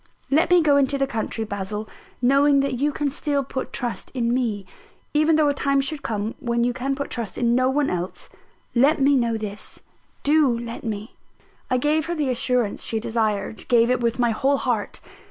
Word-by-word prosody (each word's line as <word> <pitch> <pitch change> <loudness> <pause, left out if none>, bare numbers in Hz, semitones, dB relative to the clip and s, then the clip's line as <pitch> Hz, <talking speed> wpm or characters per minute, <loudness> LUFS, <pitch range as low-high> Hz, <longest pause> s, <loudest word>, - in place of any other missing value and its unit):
Let 305 +4 +3
me 355 -2 +5
go 290 -2 +4
into 280 0 +2
the 275 - +1
country, 225 -3 -3
Basil, 210 +1 -4 0.4
knowing 275 +2 +4
that 275 -1 -1
you 295 +2 +2
can 285 0 -2
still 285 0 -1
put 260 0 -5
trust 245 -3 -4
in 235 -1 +1
me, 225 -6 -1 0.5
even 310 +2 +4
though 305 -1 +4
a 285 - +2
time 275 0 +1
should 280 +2 -2
come 215 -2 -3
when 235 -2 0
you 245 0 +1
can 270 +2 -2
put 280 0 -5
trust 230 -4 -4
in 235 -1 +2
no 255 +1 +3
one 285 +1 +1
else 180 +1 -4 0.5
let 275 +6 +4
me 275 +1 +4
know 235 -3 +1
this: 210 -1 -6 0.4
do 290 -5 +3
let 235 0 -6
me!" 215 -1 -5 0.5
I 255 - +2
gave 300 +4 +1
her 345 - -2
the 295 -4 -1
assurance 245 -3 0
she 225 - -1
desired 220 -2 -2
gave 235 -1 +4
it 250 - +2
with 235 -1 0
my 240 -2 +2
whole 275 +5 +1
heart. 240 -6 -2
250 Hz, 200 wpm, -23 LUFS, 230-280 Hz, 0.5 s, me